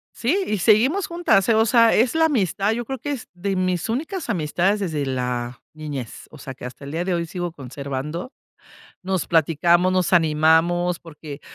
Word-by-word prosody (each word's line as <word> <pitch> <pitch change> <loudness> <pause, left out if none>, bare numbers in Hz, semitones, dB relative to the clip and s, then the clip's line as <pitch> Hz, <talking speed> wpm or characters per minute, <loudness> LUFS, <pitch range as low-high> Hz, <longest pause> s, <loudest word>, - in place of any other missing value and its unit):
Sí, 345 +12 0
y 210 - 0
seguimos 235 - +3
juntas, 335 - +2
eh, - - +5
o 220 +1 +4
sea, 230 0 +5
es 240 +6 +2
la 320 0 +4
amistad. 210 - +1
Yo 235 +1 -3
creo 265 +3 -4
que 290 +4 -5
es 270 -6 -5
de 190 +2 -3
mis 185 -2 -1
únicas 310 - -3
amistades 185 +2 0
desde 160 -7 -2
la 125 -2 -3
niñez. 145 -6 -7
O 155 - -13
sea, 135 0 -8
que 125 - -10
hasta 125 +3 -9
el 140 - -7
día 170 +3 -2
de 185 - 0
hoy 170 -1 -2
sigo 175 +1 -4
conservando. 140 - -6 0.7
Nos 190 -2 -2
platicamos, 170 +3 +3
nos 185 -1 0
animamos 165 +2 +3
porque, 150 -3 -10
175 Hz, 185 wpm, -22 LUFS, 155-220 Hz, 0.7 s, eh